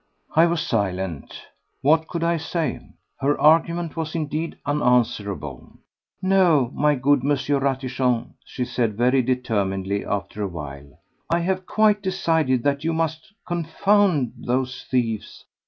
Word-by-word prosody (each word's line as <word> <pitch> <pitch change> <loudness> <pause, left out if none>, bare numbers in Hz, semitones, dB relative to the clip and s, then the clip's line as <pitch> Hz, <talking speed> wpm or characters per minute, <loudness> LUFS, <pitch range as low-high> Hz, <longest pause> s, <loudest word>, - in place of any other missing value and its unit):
I 165 +2 +6
was 170 -2 -1
silent. 95 -7 -2 0.5
What 160 +3 +4
could 170 -2 -3
I 170 0 +2
say? 160 -3 -2 0.4
Her 145 +2 +1
argument 165 +1 +3
was 160 -1 -4
indeed 155 +1 -3
unanswerable. 120 - -1 0.5
"No, 175 -10 +3
my 150 0 +2
good 140 +2 +3
M. 145 +1 +2 0.2
Ratichon," 130 -3 -1
she 125 - -4
said 115 -4 -1
very 125 +3 +3
determinedly 100 -6 -1
after 105 +1 -4
a 100 - 0
while. 70 -5 -9 0.3
"I 170 +1 +2
have 185 +1 -2
quite 215 -1 +3
decided 160 -9 +1
that 140 0 0
you 165 +1 0
must 160 +1 -2 0.2
confound 175 - +1
those 130 +1 -2
thieves. 115 -4 -2
140 Hz, 130 wpm, -23 LUFS, 120-165 Hz, 0.5 s, I